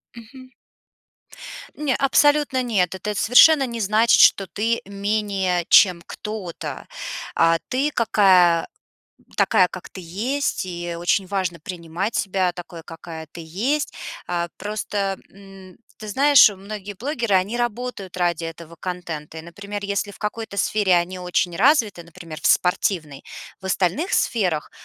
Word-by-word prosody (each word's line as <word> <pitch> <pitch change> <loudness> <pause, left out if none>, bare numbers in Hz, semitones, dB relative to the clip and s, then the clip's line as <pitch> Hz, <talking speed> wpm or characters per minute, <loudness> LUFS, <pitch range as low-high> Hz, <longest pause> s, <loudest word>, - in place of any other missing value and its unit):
Мгм. 255 +3 -13 1.2
Не, 290 -4 -1
абсолютно 290 -1 +3
нет. 195 -8 0
Это 210 +3 -4
совершенно 270 +7 +6
не 235 -2 -6
значит, 220 +2 +3
что 195 - +5
ты 230 +4 -1
менее, 200 -3 -1
чем 180 -4 +6
кто-то. 210 -6 -7 0.5
А 165 0 +4
ты 275 +4 0
какая 185 - +4 0.7
такая, 180 - +3
как 185 0 -10
ты - - -10
есть, 225 +11 -2
и 175 -1 -5
очень 175 +3 0
важно 185 -3 -2
принимать 175 +5 -5
себя 185 -2 0
такой, 170 -1 -10
какая 165 -1 -9
ты 170 - -9
есть. 235 - -2 0.3
А, 175 -1 -2
просто, 205 -1 -3
м, 195 -2 -15 0.2
ты 215 - -9
знаешь, 275 +4 +6
многие 205 0 -8
блогеры, 235 -1 -1
они 195 +6 0
работают 240 -5 -4
ради 175 -2 -1
этого 165 0 -9
контента. 170 -4 -6
И, - - -6
например, 200 +5 -8
если 200 0 -2
в - - -15
какой-то 215 0 -5
сфере 200 -2 +2
они 175 +2 -1
очень 180 0 -1
развиты, 220 - +3
например, 170 -2 -11
в - - -8
спортивной, 165 -5 0 0.4
в - - -10
остальных 190 - 0
сферах 180 -9 0
195 Hz, 135 wpm, -22 LUFS, 175-220 Hz, 1.2 s, совершенно